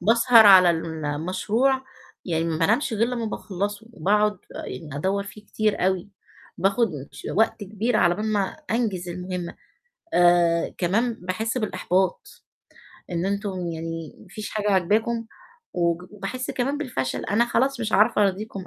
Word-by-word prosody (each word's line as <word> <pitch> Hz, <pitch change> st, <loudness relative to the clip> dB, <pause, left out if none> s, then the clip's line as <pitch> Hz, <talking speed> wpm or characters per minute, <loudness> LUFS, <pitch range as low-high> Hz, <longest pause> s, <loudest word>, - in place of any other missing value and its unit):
باسهر 230 Hz, +2 st, +6 dB
على 185 Hz, -3 st, +8 dB
المشروع، 170 Hz, -, -1 dB, 0.4 s
يعني 165 Hz, -2 st, -1 dB
ما 165 Hz, -1 st, -1 dB
بانامش 230 Hz, -, +2 dB
غير 225 Hz, +2 st, +2 dB
لمّا 240 Hz, -2 st, -3 dB
باخلصه، 205 Hz, +1 st, -4 dB
وباقعد 210 Hz, +4 st, +2 dB, 0.2 s
آآ 160 Hz, -4 st, -7 dB
ادوّر 195 Hz, +6 st, 0 dB
فيه 210 Hz, +1 st, -12 dB
كتير 215 Hz, -3 st, 0 dB
أوي، 190 Hz, 0 st, -1 dB, 0.5 s
باخد 200 Hz, +5 st, +2 dB, 0.2 s
ش -, -, -10 dB
وقت 220 Hz, -1 st, +2 dB
كبير 215 Hz, +3 st, -1 dB
على 175 Hz, 0 st, +3 dB
بال 210 Hz, +4 st, -3 dB
ما 205 Hz, -, +2 dB, 0.3 s
أنجز 210 Hz, -6 st, -1 dB
المهمة، 180 Hz, 0 st, -5 dB, 0.6 s
آآ 175 Hz, -1 st, +4 dB
كمان 220 Hz, +7 st, +1 dB
باحس 220 Hz, +6 st, -3 dB
بالإحباط، 190 Hz, -, -1 dB, 0.7 s
إن 175 Hz, +1 st, -1 dB
أنتم 195 Hz, -3 st, -2 dB
يعني 165 Hz, -1 st, -5 dB
ما -, -, -16 dB
فيش 210 Hz, +3 st, -7 dB
حاجة 210 Hz, -1 st, -1 dB
عاجباكم، 220 Hz, +5 st, +1 dB, 0.5 s
وج 170 Hz, 0 st, 0 dB
وباحس 210 Hz, +6 st, -5 dB
كمان 275 Hz, +3 st, -1 dB
بالفشل، 225 Hz, -, -3 dB
أنا 235 Hz, +4 st, +2 dB
خلاص 260 Hz, +1 st, +1 dB
مش 220 Hz, -1 st, -2 dB
عارفة 210 Hz, 0 st, +4 dB
أراضيكم، 195 Hz, 0 st, -2 dB
200 Hz, 140 wpm, -24 LUFS, 175-225 Hz, 0.7 s, على